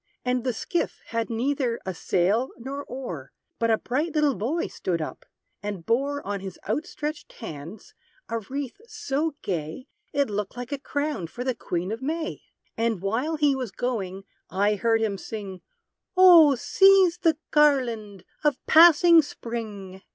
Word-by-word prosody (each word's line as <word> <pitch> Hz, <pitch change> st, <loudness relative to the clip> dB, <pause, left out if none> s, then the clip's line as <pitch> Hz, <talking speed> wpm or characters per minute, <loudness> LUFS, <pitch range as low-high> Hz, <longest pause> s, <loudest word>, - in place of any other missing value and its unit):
And 250 Hz, -1 st, 0 dB
the 255 Hz, -, 0 dB
skiff 335 Hz, +8 st, -2 dB
had 230 Hz, 0 st, -2 dB
neither 245 Hz, 0 st, -1 dB
a 190 Hz, -, -3 dB
sail 195 Hz, +9 st, +1 dB
nor 275 Hz, +4 st, -6 dB
oar; 205 Hz, -, -7 dB, 0.3 s
But 230 Hz, -, +1 dB
a 220 Hz, -, +4 dB
bright 295 Hz, +9 st, -2 dB
little 300 Hz, -2 st, +3 dB
boy 255 Hz, -, -1 dB
stood 175 Hz, -2 st, -3 dB
up, 155 Hz, -, -6 dB, 0.3 s
and 205 Hz, -5 st, -5 dB
bore, 280 Hz, +5 st, 0 dB
On 200 Hz, 0 st, -2 dB
his 190 Hz, -2 st, -8 dB
outstretched 295 Hz, +5 st, -4 dB
hands, 175 Hz, -, -9 dB, 0.3 s
a 230 Hz, -, -2 dB
wreath 275 Hz, -, -6 dB
so 295 Hz, -, -2 dB
gay, 165 Hz, +5 st, -4 dB, 0.3 s
It 280 Hz, 0 st, +1 dB
looked 210 Hz, +1 st, -4 dB
like 245 Hz, +1 st, -6 dB
a 285 Hz, -, -2 dB
crown 285 Hz, -, -2 dB
for 240 Hz, +9 st, -6 dB
the 255 Hz, 0 st, 0 dB
Queen 180 Hz, -4 st, -3 dB
of 225 Hz, +3 st, -4 dB
May. 315 Hz, +4 st, -3 dB, 0.3 s
And 225 Hz, -3 st, 0 dB
while 230 Hz, -, -1 dB
he 295 Hz, -2 st, +3 dB
was 255 Hz, -3 st, -3 dB
going, 195 Hz, -4 st, -3 dB, 0.3 s
I 205 Hz, +3 st, +2 dB
heard 225 Hz, +2 st, +1 dB
him 200 Hz, -3 st, -1 dB
sing, 200 Hz, -4 st, -7 dB, 0.6 s
"O 340 Hz, -6 st, +8 dB
seize 380 Hz, +5 st, +5 dB
the 325 Hz, -4 st, +2 dB
garland 235 Hz, -, +2 dB, 0.2 s
of 295 Hz, -1 st, +2 dB
passing 335 Hz, +1 st, +8 dB
_Spring! 210 Hz, -8 st, -7 dB
245 Hz, 155 wpm, -25 LUFS, 205-290 Hz, 0.6 s, O